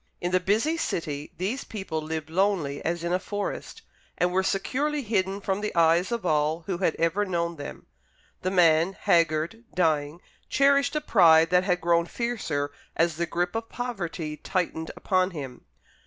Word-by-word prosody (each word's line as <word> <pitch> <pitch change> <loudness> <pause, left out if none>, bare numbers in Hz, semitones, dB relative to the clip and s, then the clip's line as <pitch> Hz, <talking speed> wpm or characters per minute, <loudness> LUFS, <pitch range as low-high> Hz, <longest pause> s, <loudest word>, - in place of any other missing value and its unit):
In 175 - -2
the 185 - +3
busy 220 - +1
city 150 - -3
these 210 +10 -2
people 190 -7 -4
lived 160 0 -5
lonely 175 -6 0
as 170 0 -2
in 170 +1 -1
a 180 - +2
forest, 205 +1 -5 0.3
and 180 0 +2
were 185 +1 +2
securely 275 +10 -1
hidden 200 -3 0
from 195 0 -2
the 210 - -3
eyes 170 +4 +3
of 235 -5 -2
all 155 0 +1
who 175 +1 -4
had 180 -4 +1
ever 165 +5 +1
known 170 -3 -1
them. 145 - -8 0.6
The 185 - 0
man 170 -1 +4
haggard, 170 +3 +1
dying 155 -2 +1 0.3
cherished 280 +1 +3
a 300 - +1
pride 165 - +5
that 180 0 +4
had 180 -2 +1
grown 170 0 +2
fiercer 170 -13 -2 0.2
as 165 -1 +1
the 170 0 -1
grip 175 +1 -1
of 225 0 -4
poverty 175 -10 -4
tightened 160 -1 -2
upon 185 -1 +1
him. 130 -4 -7
175 Hz, 170 wpm, -26 LUFS, 160-200 Hz, 0.6 s, pride